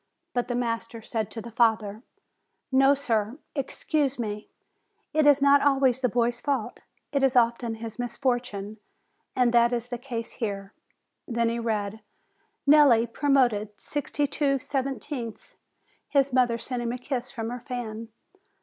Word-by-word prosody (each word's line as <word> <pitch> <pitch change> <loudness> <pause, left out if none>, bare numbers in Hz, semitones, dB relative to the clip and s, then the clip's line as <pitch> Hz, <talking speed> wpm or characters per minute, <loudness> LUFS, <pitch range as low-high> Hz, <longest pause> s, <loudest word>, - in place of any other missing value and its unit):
But 245 -1 0
the 245 - -2
master 230 -1 -3
said 220 -2 -2
to 225 - -6
the 235 - -9
father: 220 -3 +1 0.7
"No, 270 +2 +5
sir, 230 -3 -1 0.2
excuse 280 0 -1
me; 210 -3 -4 0.6
it 305 -1 +4
is 285 -1 +5
not 280 0 +6
always 270 -3 +3
the 250 -1 +1
boy's 240 +1 +1
fault; 270 -6 -2 0.3
it 280 - +1
is 270 -1 +3
often 235 -1 +2
his 225 +1 -8
misfortune. 240 -4 -2 0.6
And 250 -2 +3
that 235 0 +5
is 240 0 -2
the 245 -1 -4
case 235 -3 -5
here." 200 -3 -4 0.5
Then 235 -1 +1
he 235 +1 -2
read: 215 -2 -2 0.7
"Nelli, 280 -6 +7
promoted, 240 -5 +2
sixty 290 0 -2
two 280 -1 +1
seventieths." 265 -3 -4 0.6
His 275 -2 +2
mother 245 -2 +3
sent 245 +1 -4
him 235 -1 -2
a - - -3
kiss 250 0 -4
from 230 -3 -5
her 245 - -5
fan. 230 -2 -5
240 Hz, 150 wpm, -26 LUFS, 230-270 Hz, 0.7 s, Nelli